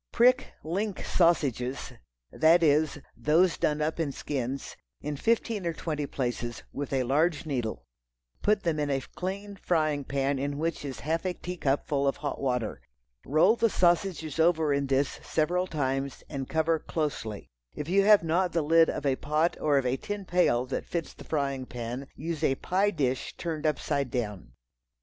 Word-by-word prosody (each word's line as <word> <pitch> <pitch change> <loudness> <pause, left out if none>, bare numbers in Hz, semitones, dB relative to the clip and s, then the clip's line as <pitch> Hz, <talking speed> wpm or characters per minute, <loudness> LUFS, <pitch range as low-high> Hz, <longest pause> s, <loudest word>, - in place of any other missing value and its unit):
Prick 250 +2 +4
"link" 195 +5 -2
sausages—that 135 - +1
is, 150 0 +3 0.2
those 165 +4 +3
done 150 0 +1
up 160 +2 -2
in 155 -4 0
skins, 135 -1 -4 0.2
in 150 0 -4
fifteen 225 +4 0
or 170 -1 -1
twenty 150 -3 -3
places, 120 -3 -3
with 145 0 -4
a 135 -2 +1
large 155 +6 +1
needle; 125 -7 -3 0.6
put 210 0 +2
them 165 -4 0
in 145 -1 0
a 135 -1 0
clean 200 +2 -4
frying 155 -6 0
pan 135 0 0
in 140 +1 -2
which 165 0 -2
is 135 -3 -6
a - - -13
half 160 +3 0
a 185 -1 -1
teacup 155 -6 -1
full 140 -1 +1
of 135 - +1
hot 145 - -4
water. 125 - -1 0.5
Roll 165 - +5
the 230 -1 +2
sausages 175 -4 +1
over 160 -3 +3
in 140 0 0
this 135 +1 0
several 180 +4 0
times 135 -4 -2
and 135 -3 -5
cover 160 0 +2
closely. 140 -12 -4 0.2
If 150 - -5
you 195 +3 +4
have 210 -2 +6
not 175 +2 +1
the 165 - +1
lid 165 +2 +5
of 145 - -3
a 135 -2 +2
pot 155 +3 +1
or 145 -2 +3
of 135 - +1
a 125 +1 +1
tin 205 +4 -5
pail 175 -9 +2
that 130 - -4
fits 170 -3 -3
the - - -13
frying 140 -4 -1
pan, 125 +3 -5
use 160 +1 -4
a 135 - +3
pie 190 +8 +1
dish 135 -9 -2
turned 160 -2 -2
upside 140 -3 0
down. 105 - -4
150 Hz, 175 wpm, -28 LUFS, 135-170 Hz, 0.6 s, have